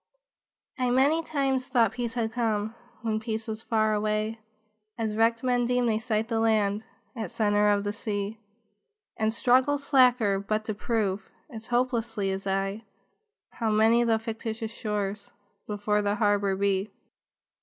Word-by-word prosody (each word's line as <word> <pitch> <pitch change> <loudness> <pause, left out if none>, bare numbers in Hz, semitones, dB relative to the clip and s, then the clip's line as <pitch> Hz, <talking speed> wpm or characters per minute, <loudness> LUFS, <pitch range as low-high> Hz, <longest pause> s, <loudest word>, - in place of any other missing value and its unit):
I 250 -1 +1
many 275 +6 +3
times 270 -5 -1
thought 235 -6 +3
peace 240 -1 -4
had 225 -2 -1
come, 220 -2 -1 0.3
When 220 -1 0
peace 220 0 -4
was 220 0 -4
far 215 -1 +1
away; 215 +1 -1 0.6
As 220 -2 -2
wrecked 230 +1 +2
men 245 -1 +2
deem 250 0 +1
they 220 -2 +1
sight 220 -1 -1
the 225 -1 0
land 215 -2 +2 0.3
At 220 -6 -4
centre 210 0 +2
of 205 -1 +2
the 205 0 -2
sea, 210 0 -4 0.8
And 220 -1 +1
struggle 255 +5 +3
slacker, 250 -8 +3
but 215 +2 -2
to 215 - -2
prove, 210 -2 -1 0.2
As 225 -1 -9
hopelessly 240 -5 0
as 195 +1 -4
I, 195 +3 -1 0.7
How 225 -2 -2
many 220 +2 +4
the 225 -1 +3
fictitious 225 0 -5
shores 205 -2 -4 0.3
Before 210 0 0
the 205 0 0
harbor 205 -3 +2
lie. 195 +1 0
220 Hz, 150 wpm, -27 LUFS, 210-235 Hz, 0.8 s, many